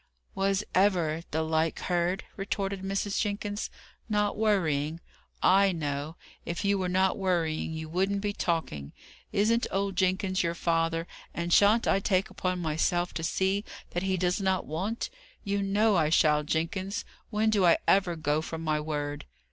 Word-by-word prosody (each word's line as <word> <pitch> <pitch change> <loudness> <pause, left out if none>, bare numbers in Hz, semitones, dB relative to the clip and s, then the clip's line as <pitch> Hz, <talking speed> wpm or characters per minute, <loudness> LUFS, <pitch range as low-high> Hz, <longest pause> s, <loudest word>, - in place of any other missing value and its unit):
"Was 195 +1 +1
ever 175 -5 +2
the 160 +1 0
like 160 0 0
heard?" 175 +2 0
retorted 195 -1 -3
Mrs. 195 +1 -1
Jenkins, 205 0 -2 0.4
"Not 210 -1 +1
worrying! 165 -8 +1 0.4
I 195 +1 +5
know. 145 -1 -3 0.3
If 170 +3 -4
you 200 0 +2
were 185 -1 -1
not 190 +2 +2
worrying, 170 -5 0
you 160 0 -5
wouldn't 190 +4 0
be 205 0 -1
talking. 160 - -2 0.4
Isn't 220 +3 +2
old 195 0 -1
Jenkins 185 +1 +1
your 170 -1 -1
father, 165 -1 0 0.3
and 170 0 -1
shan't 210 +3 +5
I 195 - +3
take 195 -1 +1
upon 185 0 -2
myself 175 +2 0
to 165 - -4
see 190 +4 +1 0.3
that 175 - -2
he 190 0 0
does 180 +2 0
not 190 -1 +1
want? 190 +9 -3 0.3
You 200 -1 -1
know 205 +2 +2
I 155 -2 +3
shall, 150 -2 +4
Jenkins. 185 +7 -2 0.2
When 220 0 +1
do 205 -3 +3
I 170 -2 +6
ever 190 -3 +3
go 155 -1 0
from 160 0 -6
my 155 -1 +1
word?" 145 -1 -3
185 Hz, 160 wpm, -28 LUFS, 160-200 Hz, 0.4 s, I